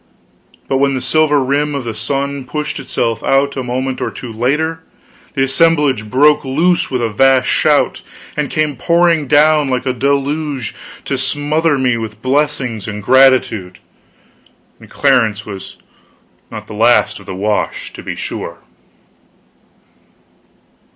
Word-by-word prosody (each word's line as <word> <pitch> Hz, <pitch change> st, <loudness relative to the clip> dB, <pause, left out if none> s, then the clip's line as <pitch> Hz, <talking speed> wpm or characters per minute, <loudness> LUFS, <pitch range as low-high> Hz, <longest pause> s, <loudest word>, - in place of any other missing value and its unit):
But 135 Hz, -, 0 dB
when 140 Hz, 0 st, +2 dB
the -, -, -1 dB
silver 145 Hz, +2 st, +2 dB
rim 145 Hz, +2 st, 0 dB
of 140 Hz, -, -3 dB
the 115 Hz, -1 st, -4 dB
sun 140 Hz, +4 st, -3 dB
pushed 150 Hz, +3 st, -4 dB
itself 115 Hz, -4 st, -2 dB
out, 140 Hz, +1 st, +1 dB
a 135 Hz, -, -2 dB
moment 130 Hz, +1 st, -3 dB
or -, -, -1 dB
two 120 Hz, -3 st, -8 dB
later, 150 Hz, +8 st, -1 dB, 0.5 s
the 135 Hz, -, +2 dB
assemblage 135 Hz, -5 st, +2 dB
broke 145 Hz, +5 st, +4 dB
loose 165 Hz, +6 st, +1 dB
with 125 Hz, -2 st, -1 dB
a -, -, +2 dB
vast 130 Hz, +4 st, +3 dB
shout -, -, +2 dB, 0.3 s
and 150 Hz, -2 st, -2 dB
came 150 Hz, -3 st, -1 dB
pouring 170 Hz, 0 st, +2 dB
down 150 Hz, 0 st, +4 dB
like 125 Hz, 0 st, -1 dB
a 130 Hz, -, 0 dB
deluge 140 Hz, -1 st, -1 dB, 0.3 s
to 135 Hz, -, -2 dB
smother 145 Hz, +3 st, +1 dB
me 125 Hz, -3 st, +1 dB
with 110 Hz, -2 st, -6 dB
blessings 130 Hz, -5 st, -1 dB
and 105 Hz, -1 st, -6 dB
gratitude; 130 Hz, -7 st, +3 dB, 1.0 s
and -, -, -15 dB
Clarence 115 Hz, -7 st, +1 dB
was 95 Hz, -2 st, -9 dB, 0.7 s
not -, -, -8 dB
the -, -, -10 dB
last -, -, +2 dB
of -, -, -16 dB
the 95 Hz, -, -5 dB
wash, 105 Hz, +2 st, -2 dB
to -, -, -9 dB
be -, -, -5 dB
sure. -, -, -6 dB
135 Hz, 145 wpm, -16 LUFS, 125-150 Hz, 1.0 s, broke